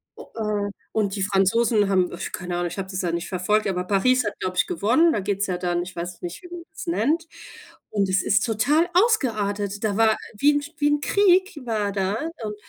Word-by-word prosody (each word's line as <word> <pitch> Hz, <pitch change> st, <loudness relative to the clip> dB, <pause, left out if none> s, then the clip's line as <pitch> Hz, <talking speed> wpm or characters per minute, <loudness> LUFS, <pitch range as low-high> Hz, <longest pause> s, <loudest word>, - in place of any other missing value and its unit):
äh, 210 Hz, -2 st, -3 dB, 0.2 s
und 205 Hz, -3 st, 0 dB
die 195 Hz, -, -1 dB
Franzosen 205 Hz, +2 st, +2 dB
haben, 185 Hz, -2 st, +2 dB
äh, -, -, -8 dB
keine 180 Hz, -1 st, -4 dB
Ahnung, 175 Hz, 0 st, -1 dB
ich 175 Hz, -, -7 dB
habe 190 Hz, -, -4 dB
das 190 Hz, -1 st, -3 dB
ja 175 Hz, -2 st, -1 dB
nicht 170 Hz, 0 st, -3 dB
verfolgt, 205 Hz, +3 st, 0 dB
aber 180 Hz, -2 st, -1 dB
Paris 240 Hz, +7 st, +2 dB
hat, 210 Hz, -, -4 dB
glaube 185 Hz, 0 st, -3 dB
ich, 180 Hz, -, +2 dB
gewonnen. 325 Hz, -, +3 dB
Da 215 Hz, -, 0 dB
geht's 200 Hz, 0 st, -1 dB
ja 180 Hz, -2 st, -1 dB
dann, 175 Hz, -1 st, -1 dB
ich 180 Hz, +1 st, -9 dB
weiß 175 Hz, 0 st, -6 dB
nicht, 175 Hz, 0 st, -6 dB
wie 355 Hz, -, -11 dB
man 350 Hz, -1 st, -8 dB
das 315 Hz, -, -9 dB
nennt. 330 Hz, +1 st, 0 dB, 0.6 s
Und 200 Hz, -2 st, 0 dB
es 185 Hz, +2 st, +2 dB
ist 210 Hz, +2 st, +2 dB
total 280 Hz, +10 st, +2 dB
ausgeartet. 215 Hz, -, +1 dB
Da 210 Hz, -2 st, 0 dB
war 220 Hz, -1 st, +4 dB, 0.2 s
wie 290 Hz, +6 st, +4 dB
'n 290 Hz, 0 st, 0 dB
wie 290 Hz, -, +2 dB
'n 295 Hz, 0 st, +1 dB
Krieg 380 Hz, -1 st, +3 dB
war 215 Hz, -3 st, -1 dB
da. 195 Hz, 0 st, -1 dB, 0.3 s
Und 210 Hz, -1 st, -4 dB
210 Hz, 220 wpm, -23 LUFS, 190-265 Hz, 0.6 s, war